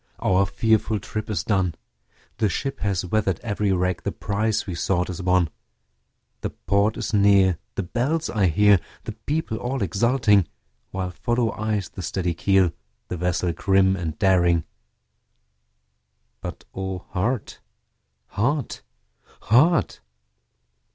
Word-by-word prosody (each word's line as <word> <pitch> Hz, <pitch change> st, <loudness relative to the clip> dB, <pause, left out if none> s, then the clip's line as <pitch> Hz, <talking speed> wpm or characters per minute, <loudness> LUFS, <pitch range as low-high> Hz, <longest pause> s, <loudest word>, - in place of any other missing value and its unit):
our 95 Hz, +1 st, +2 dB
fearful 110 Hz, 0 st, +1 dB
trip 110 Hz, +2 st, -5 dB
is 90 Hz, -7 st, -1 dB
done, 95 Hz, -6 st, 0 dB, 0.6 s
The 110 Hz, -3 st, +2 dB
ship 135 Hz, +7 st, -3 dB
has 95 Hz, -4 st, -1 dB
weather'd 95 Hz, -2 st, 0 dB
every 105 Hz, -2 st, -1 dB
rack, 90 Hz, -1 st, 0 dB
the -, -, -2 dB
prize 105 Hz, +1 st, -1 dB
we 95 Hz, -, -4 dB
sought 90 Hz, +1 st, 0 dB
is 90 Hz, -, -6 dB
won, 90 Hz, -3 st, +2 dB, 0.9 s
The -, -, -3 dB
port 100 Hz, +2 st, 0 dB
is -, -, -4 dB
near, 100 Hz, -3 st, +4 dB, 0.2 s
the 100 Hz, -, -1 dB
bells 135 Hz, -, -1 dB
I 100 Hz, -4 st, +1 dB
hear, 100 Hz, +3 st, +5 dB, 0.2 s
the -, -, -5 dB
people 150 Hz, -7 st, -3 dB
all 125 Hz, +1 st, -2 dB
exulting, 105 Hz, 0 st, +3 dB, 0.4 s
While 95 Hz, -1 st, -3 dB
follow 120 Hz, +5 st, 0 dB
eyes 105 Hz, -2 st, -2 dB
the -, -, -8 dB
steady 90 Hz, 0 st, -1 dB
keel, 95 Hz, 0 st, +3 dB, 0.4 s
the 90 Hz, -, -3 dB
vessel 90 Hz, 0 st, 0 dB
grim 95 Hz, +1 st, +3 dB
and 85 Hz, -4 st, -4 dB
daring; 90 Hz, -4 st, +3 dB, 1.8 s
But -, -, -7 dB
O 95 Hz, -1 st, -5 dB
heart! 105 Hz, +5 st, -2 dB, 0.7 s
heart! 135 Hz, +5 st, -1 dB, 0.6 s
heart! 150 Hz, +10 st, +3 dB
100 Hz, 130 wpm, -24 LUFS, 90-110 Hz, 1.8 s, hear